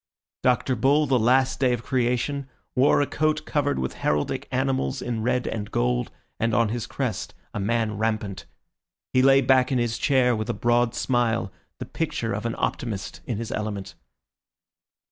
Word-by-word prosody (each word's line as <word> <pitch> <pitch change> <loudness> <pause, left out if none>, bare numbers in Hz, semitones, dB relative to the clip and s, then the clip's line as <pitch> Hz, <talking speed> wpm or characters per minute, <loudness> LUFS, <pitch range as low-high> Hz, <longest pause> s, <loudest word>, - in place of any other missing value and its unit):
Dr. 125 +1 +2
Bull, 140 +6 +3
the 130 -3 +2
last 130 +3 +3
day 130 -2 +3
of 120 -1 -3
Creation, 130 +2 0 0.3
wore 135 +2 +4
a - - +3
coat 155 +1 0
covered 145 -1 0
with 65 0 -2
heraldic 75 0 -1
animals 130 0 0
in 120 -3 -3
red 125 +1 0
and 105 -2 -4
gold, - - 0 0.3
and 115 0 +1
on 115 -2 +3
his 115 0 -3
crest - - -3 0.2
a - - -3
man 110 0 0
rampant. 110 -3 -2 0.7
He 130 - +5
lay 135 +1 +6
back 130 0 +3
in 130 - +2
his 120 -2 -1
chair 130 -3 +3
with 110 0 -4
a - - -1
broad 120 0 +2
smile, 120 -5 0 0.3
the - - -6
picture - - -2
of - - -2
an - - -3
optimist 105 -6 -3
in 120 - -2
his 115 0 -5
element. 105 -2 -4
120 Hz, 170 wpm, -25 LUFS, 110-130 Hz, 0.7 s, lay